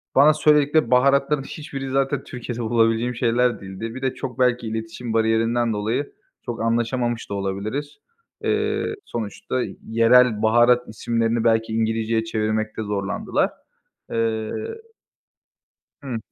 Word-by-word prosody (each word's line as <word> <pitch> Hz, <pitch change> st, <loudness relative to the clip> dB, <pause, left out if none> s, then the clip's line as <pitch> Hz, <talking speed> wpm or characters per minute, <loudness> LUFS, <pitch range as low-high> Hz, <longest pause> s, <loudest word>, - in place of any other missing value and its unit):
bana 145 Hz, +3 st, +7 dB
söyledikleri 150 Hz, 0 st, +3 dB
baharatların 140 Hz, +2 st, +3 dB
hiçbiri 135 Hz, -2 st, -6 dB
zaten 135 Hz, 0 st, 0 dB
Türkiye'de 120 Hz, -1 st, -6 dB
bulabileceğim 115 Hz, +1 st, +1 dB
şeyler 120 Hz, -1 st, +1 dB
değildi. 100 Hz, +4 st, -6 dB
Bir 130 Hz, -, -7 dB
de 130 Hz, -1 st, 0 dB
çok 130 Hz, -3 st, -6 dB
belki 125 Hz, -2 st, +2 dB
iletişim 110 Hz, +1 st, -5 dB
bariyerinden 115 Hz, +1 st, +2 dB
dolayı 110 Hz, +7 st, -2 dB, 0.3 s
çok 120 Hz, -1 st, -4 dB
anlaşamamış 120 Hz, +1 st, 0 dB
da -, -, -4 dB
olabiliriz. 100 Hz, +9 st, -3 dB, 0.5 s
Eee, 430 Hz, 0 st, 0 dB
sonuçta 115 Hz, +3 st, -3 dB, 0.3 s
yerel 115 Hz, 0 st, +4 dB
baharat 120 Hz, +2 st, +4 dB
isimlerini 115 Hz, +1 st, -1 dB
belki 115 Hz, -1 st, +2 dB
İngilizce'ye 110 Hz, 0 st, 0 dB
çevirmekte 110 Hz, 0 st, -2 dB
zorlandılar. 100 Hz, -2 st, -1 dB, 0.6 s
Eee 110 Hz, -1 st, -1 dB, 1.5 s
Hıı. 130 Hz, -5 st, -4 dB
115 Hz, 115 wpm, -23 LUFS, 110-130 Hz, 1.5 s, bana